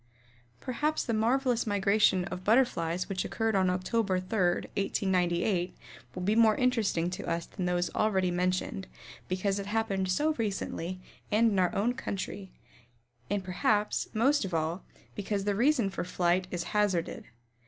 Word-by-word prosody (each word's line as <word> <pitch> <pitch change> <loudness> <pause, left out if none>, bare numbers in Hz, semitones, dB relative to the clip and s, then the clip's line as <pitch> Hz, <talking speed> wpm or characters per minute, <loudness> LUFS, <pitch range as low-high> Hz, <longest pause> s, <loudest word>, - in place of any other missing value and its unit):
Perhaps 300 - -1
the 230 - -1
marvelous 240 +2 +1
migration 200 -2 +3
of 185 -1 -6
Butterflies 185 -7 +2
which 190 -2 -2
occurred 225 -2 -1
on 190 -1 +3
Oct. 180 0 -1
3, 230 - +1
1898, 185 -1 0 0.4
will 180 - -4
be 205 +4 +2
more 225 -2 +5
interesting 220 -9 +1
to 185 - -6
us 170 0 -1
than 185 -3 -4
those 175 0 0
already 190 -4 +1
mentioned 180 - -1 0.4
because 195 +2 -1
it 200 - -5
happened 205 -3 -1
so 300 +12 +2
recently 185 -4 -3 0.3
and 225 +2 +4
in 195 - +1
our 180 -1 +1
own 220 +5 +1
country, 200 -5 -5 0.8
and 200 -1 -1
perhaps, 205 +3 0
most 265 +6 +2
of 185 -3 -3
all, 165 +3 -1 0.3
because 200 -1 -2
the 205 0 +1
reason 240 +1 +3
for - - -3
flight 180 0 +1
is 175 -2 -3
hazarded. 205 -5 0
195 Hz, 150 wpm, -29 LUFS, 180-220 Hz, 0.8 s, more